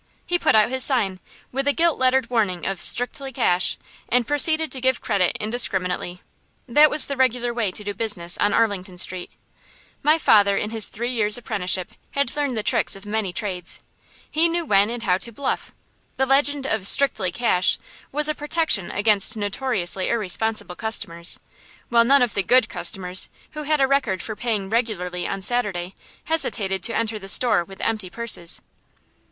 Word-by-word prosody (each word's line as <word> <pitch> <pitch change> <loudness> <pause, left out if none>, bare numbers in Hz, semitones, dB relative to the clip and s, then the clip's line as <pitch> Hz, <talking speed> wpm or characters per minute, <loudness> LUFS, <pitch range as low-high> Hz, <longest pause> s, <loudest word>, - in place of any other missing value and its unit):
He 350 0 -1
put - - +2
out 215 +2 +3
his 260 -1 0
sign, 200 -9 +1 0.3
with 270 +2 -3
a 285 - +3
gilt 335 0 +1
lettered 260 -1 +2
warning 205 -7 -1
of 195 -2 -3
"Strictly 265 +2 0
Cash," 180 -6 +1 0.3
and 245 -1 +2
proceeded 315 +3 +2
to 260 - 0
give 260 0 +1
credit 185 -3 0
indiscriminately. 185 -5 -1 0.4
That 295 +5 +5
was 300 - +5
the 280 - -4
regular 250 -2 0
way 230 -4 -1
to 210 - -6
do 205 0 -4
business 190 -6 0
on 205 - +2
Arlington 195 -5 -1
Street. 180 0 +2 0.7
My 305 +3 +3
father, 205 -9 +3
in 210 - -3
his 225 -2 +1
three 240 +3 -4
years' 215 -3 +4
apprenticeship, 195 -4 -2 0.2
had 280 -2 -1
learned 285 -5 -2
the 215 - -2
tricks - - +2
of 195 +1 -12
many 210 -2 -3
trades. 180 -3 -4 0.4
He 325 +3 +1
knew 340 0 -2
when 200 -3 +3
and 235 0 -5
how 185 -3 +1
to 235 - -3
"bluff." 265 +4 -4 0.5
The 265 - +1
legend 280 +1 +1
of 220 -7 +1
"Strictly 220 -10 +3
Cash" 180 -3 +2 0.3
was 300 +2 +3
a 305 - 0
protection 295 - 0
against 205 +1 +2
notoriously 205 -3 -1
irresponsible 220 -3 0
customers; 170 -7 -2 0.5
while 235 -1 +4
none 275 +1 +4
of 240 - -2
the 200 - 0
"good" 245 +3 +3
customers, 185 -2 0 0.2
who 305 - -7
had 305 0 +1
a 270 - +4
record 260 -9 -1
for 215 - -5
paying 215 -4 -3
regularly 190 -6 -2
on 195 -1 -4
Saturday, 195 -6 -1 0.3
hesitated 205 - 0
to 230 - +2
enter 225 -1 -2
the 195 -1 -7
store 220 -5 +4
with 195 +2 -14
empty 215 -5 -2
purses. 200 -4 -2
220 Hz, 175 wpm, -22 LUFS, 195-260 Hz, 0.7 s, That